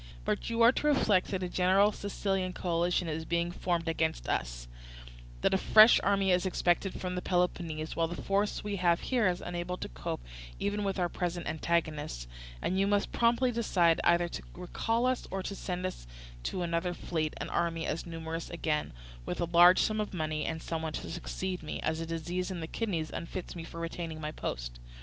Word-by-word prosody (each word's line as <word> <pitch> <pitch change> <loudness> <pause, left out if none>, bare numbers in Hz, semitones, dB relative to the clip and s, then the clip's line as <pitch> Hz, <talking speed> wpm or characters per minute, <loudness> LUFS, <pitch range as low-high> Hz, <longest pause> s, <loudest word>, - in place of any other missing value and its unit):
But - - -1
you 230 0 +2
are 235 - +8
to 295 - -1
reflect 210 -10 +3
that 190 -2 -2
a - - -1
general 190 +3 +4
Sicilian 195 -2 -2
coalition 175 0 0
is 160 0 -2
being 170 +1 0
formed 175 -1 -1
against 160 0 0
us; - - -2 0.7
that - - +3
a 190 - +3
fresh 215 +4 +8
army 195 -1 +2
is 180 0 +3
expected 185 0 +1
from 180 -1 -3
Peloponnese, 170 -4 -1
while 165 -1 +2
the 175 - -6
force 200 +1 0
we 205 -1 -2
have 175 -2 +3
here 245 -6 +2
is 180 -1 0
unable 175 +1 -3
to - - -5
cope - - -5 0.4
even 205 +1 -1
with 195 -1 -1
our 180 -2 +2
present 175 0 -3
antagonists; 155 - -1 0.4
and 185 +2 +1
you 195 - +3
must 205 0 +1
promptly 235 +2 +3
decide 180 -8 +3
either 175 0 +4
to - - -6
recall 225 +6 -1
us 255 -1 0
or 190 -1 -3
to 200 - -4
send 180 -1 -3
out 185 - -1 0.5
to 180 - -3
us - - 0
another 170 +1 -1
fleet 155 -2 -2
and - - -5
army 165 -1 0
as 165 - -3
numerous 165 0 -5
again, 155 - -1 0.3
with - - -3
a 170 - +1
large 175 +2 +7
sum 215 0 +2
of 210 -2 -4
money, 155 -2 -1
and 160 -1 -3
someone 160 -1 -3
to - - -5
succeed 180 +2 -4
me, 155 - -5
as 160 0 -1
a 165 - -4
disease 170 +3 -2
in 185 -2 -4
the 160 - -3
kidneys 165 -4 -2
unfits 175 +2 -5
me 170 - -5
for 165 0 -8
retaining 165 -1 -4
my 150 -1 -3
post. - - -5
175 Hz, 200 wpm, -31 LUFS, 165-195 Hz, 0.7 s, are